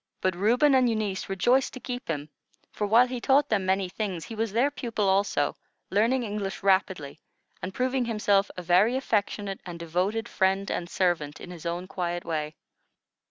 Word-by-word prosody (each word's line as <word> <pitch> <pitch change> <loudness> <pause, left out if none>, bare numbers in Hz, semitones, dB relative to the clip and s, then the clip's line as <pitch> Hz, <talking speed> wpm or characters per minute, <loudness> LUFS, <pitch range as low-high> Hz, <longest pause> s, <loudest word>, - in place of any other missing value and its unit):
But 185 - +1
Reuben 240 +10 +3
and 255 -2 +4
Eunice 210 -5 -2
rejoiced 240 +8 +2
to 255 - -7
keep 250 0 -6
him; 150 -2 -3 0.4
for 210 - -2
while 230 +4 +6
he 250 -1 -5
taught 275 +3 +3
them 195 -3 +1
many 190 0 +2
things, 185 -3 -4
he - - -8
was 225 -1 -2
their 245 +7 +2
pupil 230 -7 -2
also, 190 -6 +1 0.4
learning 230 +6 +2
English 205 -3 -4
rapidly, 190 -7 +1 0.4
and 185 - -4
proving 255 +3 0
himself 205 -3 +2
a 180 - -5
very 180 +8 +4
affectionate 205 -5 -1
and 175 -2 -7
devoted 180 +7 -1
friend 195 +1 +1
and 175 - -3
servant, 170 -6 0
in 180 - -9
his 170 -1 -7
own 175 +2 -3
quiet 175 -2 -3
way. 155 -2 -3
195 Hz, 175 wpm, -27 LUFS, 180-230 Hz, 0.4 s, while